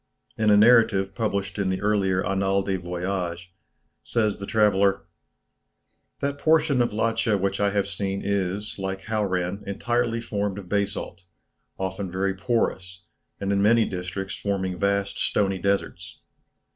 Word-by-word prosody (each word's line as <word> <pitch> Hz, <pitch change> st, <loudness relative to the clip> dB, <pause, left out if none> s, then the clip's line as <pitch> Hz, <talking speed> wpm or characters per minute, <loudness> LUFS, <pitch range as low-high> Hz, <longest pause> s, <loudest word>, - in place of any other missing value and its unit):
In 110 Hz, -1 st, +2 dB
a 105 Hz, -, +6 dB
narrative 105 Hz, -4 st, +5 dB
published 100 Hz, -3 st, -2 dB
in 95 Hz, -2 st, +1 dB
the 95 Hz, -, -1 dB
earlier 100 Hz, -3 st, +1 dB
"Annales 95 Hz, 0 st, +1 dB
des 95 Hz, -2 st, -1 dB
Voyages," 90 Hz, 0 st, -3 dB, 0.5 s
says 110 Hz, -4 st, 0 dB
the 100 Hz, -, -6 dB
traveller, 100 Hz, -3 st, +3 dB, 1.2 s
"That 140 Hz, 0 st, -2 dB
portion 155 Hz, -4 st, +3 dB
of 120 Hz, -, +1 dB
Ladscha 110 Hz, 0 st, +1 dB
which 100 Hz, +1 st, -1 dB
I 100 Hz, 0 st, +3 dB
have 100 Hz, -1 st, 0 dB
seen 100 Hz, 0 st, -3 dB
is, 100 Hz, +1 st, -2 dB
like 95 Hz, 0 st, -4 dB
Hauran, 100 Hz, -3 st, -1 dB
entirely 120 Hz, +3 st, 0 dB
formed 100 Hz, -4 st, -2 dB
of 100 Hz, -3 st, -8 dB
basalt, 100 Hz, -3 st, -2 dB, 0.6 s
often 95 Hz, 0 st, -4 dB
very 95 Hz, +1 st, 0 dB
porous, 95 Hz, -4 st, -2 dB, 0.4 s
and 100 Hz, 0 st, -1 dB
in 100 Hz, -, +2 dB
many 115 Hz, +2 st, +4 dB
districts 95 Hz, +1 st, -5 dB
forming 95 Hz, -3 st, -2 dB
vast 100 Hz, 0 st, 0 dB
stony 95 Hz, -2 st, +1 dB
deserts. 90 Hz, -3 st, -2 dB
100 Hz, 140 wpm, -25 LUFS, 95-105 Hz, 1.2 s, a